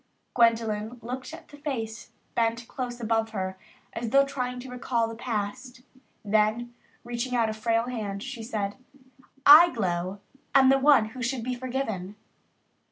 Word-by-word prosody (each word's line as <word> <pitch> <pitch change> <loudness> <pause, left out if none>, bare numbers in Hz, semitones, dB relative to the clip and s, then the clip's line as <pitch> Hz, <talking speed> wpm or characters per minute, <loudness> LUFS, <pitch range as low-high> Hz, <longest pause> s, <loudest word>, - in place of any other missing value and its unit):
Gwendolyn 230 -1 +2
looked 255 +4 -6
at 325 - -11
the 290 - -13
face 235 -7 -5 0.2
bent 230 0 0
close 245 -2 -5
above 225 -1 0
her 190 0 -3 0.3
as 230 0 -3
though 275 +3 +5
trying 250 -3 -3
to 260 0 -9
recall 235 -2 -1
the 225 - -6
past. 245 +2 -4 0.4
Then, 215 +3 +1 0.3
reaching 240 +1 -3
out 225 -2 +2
a - - -4
frail 225 +1 +1
hand, 215 -5 -4
she 255 -3 -6
said, 210 -3 -3 0.7
"I, 315 +4 +10
Glow, 185 - -2 0.4
am 265 -1 +7
the 270 0 +5
one 265 -6 +5
who 250 +2 -9
should 245 0 -2
be 250 +2 -2
forgiven." 240 -7 -4
235 Hz, 155 wpm, -27 LUFS, 220-255 Hz, 0.7 s, I